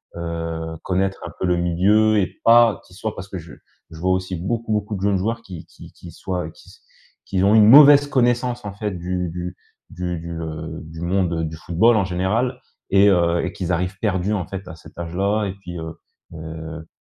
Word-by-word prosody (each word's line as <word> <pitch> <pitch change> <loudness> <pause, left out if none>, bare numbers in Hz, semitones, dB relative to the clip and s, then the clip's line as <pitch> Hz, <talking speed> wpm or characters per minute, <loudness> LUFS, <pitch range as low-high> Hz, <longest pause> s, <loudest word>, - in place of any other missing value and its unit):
heu, 80 -1 -4
connaître 95 +1 -1
un - - -9
peu - - -1
le 90 - +2
milieu 100 +6 +3
et 95 -3 0
pas 115 -3 +5
qu'ils 90 - -18
soient, 110 +2 -4
parce 95 - -8
que 95 - -5
je 80 -2 -10 0.4
vois 85 +3 -1
aussi 95 0 -1
beaucoup 110 +6 -3
beaucoup 105 0 -2
de 95 - -6
jeunes 100 -1 +2
joueurs 115 +5 -2
qui 90 -7 -10
qui - - -14
qui 85 - -12
soient, 90 -4 -4
qui - - -19 0.6
qui 95 -1 0
ont 100 +2 +5
une 105 -1 +7
mauvaise 145 +3 +9
connaissance 120 -2 +1
en 100 - -5
fait 105 0 -3
du 90 0 -3
du 90 +2 -6 0.3
du 90 -1 -4
du, 85 +1 -7
heu, 80 0 -6
du 80 +1 -10
monde, 90 0 0
heu, 80 - -1
du 80 0 -6
football 85 +9 +2
en 105 - +3
général 105 +8 -1 0.3
et 100 +1 +5
heu, 85 -2 +2
et 90 - -4
qu'ils 90 -2 -3
arrivent 90 +3 -1
perdus 100 -1 0
en 95 -5 -1
fait 95 -1 -7
à 80 - -8
cet 80 - -16
âge 85 0 -6
là 100 +3 +1
et 95 - -3
puis, 95 -3 -9
heu, 80 0 -7 0.4
heu, 80 0 -8
95 Hz, 210 wpm, -21 LUFS, 85-105 Hz, 0.6 s, mauvaise